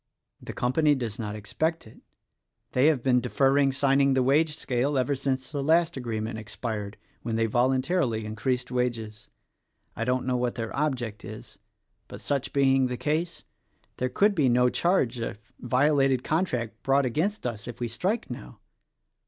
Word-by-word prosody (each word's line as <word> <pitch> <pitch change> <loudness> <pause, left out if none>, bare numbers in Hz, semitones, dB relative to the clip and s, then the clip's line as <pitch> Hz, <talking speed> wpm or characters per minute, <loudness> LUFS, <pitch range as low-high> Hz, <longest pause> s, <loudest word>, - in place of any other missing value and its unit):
The - - -7
company 145 +4 +2
does 120 -5 -4
not 105 -2 -4
expect 160 +11 -2
it. 110 - -15 0.7
They 130 +3 +4
have 145 -6 +2
been 125 -2 +3
deferring 135 +2 +3
signing 135 0 +3
the 130 - +3
wage 150 +4 +2
scale 135 0 -1
ever 135 +2 +1
since 130 0 -2
the 145 -2 -2
last 165 +3 +3
agreement 110 -3 -3
expired 110 -1 -5
— - - -37
when 115 -1 -3
they 115 0 +2
voluntarily 130 +1 +1
increased 125 +4 -2
wages. 115 -4 -3 0.7
I 115 - -2
don't 125 +1 0
know 130 -1 +1
what 125 -1 -1
their 115 -2 -4
object 125 -7 -2
is; 110 0 -10 0.5
but - - -9
such 140 -2 -2
being 135 -1 +3
the 125 0 -4
case, 165 +5 -2 0.5
there 130 - -1
could 200 +11 +3
be 150 -8 +2
no 125 +1 +4
charge 135 -7 +1
of 115 -2 -4 0.2
violated 135 0 +2
contract 125 - -1
brought 135 0 +2
against 165 - -1
us 115 -3 -4
if 120 - -7
we 120 - -1
strike 185 - -2
now. - - -9
130 Hz, 165 wpm, -27 LUFS, 115-140 Hz, 0.7 s, They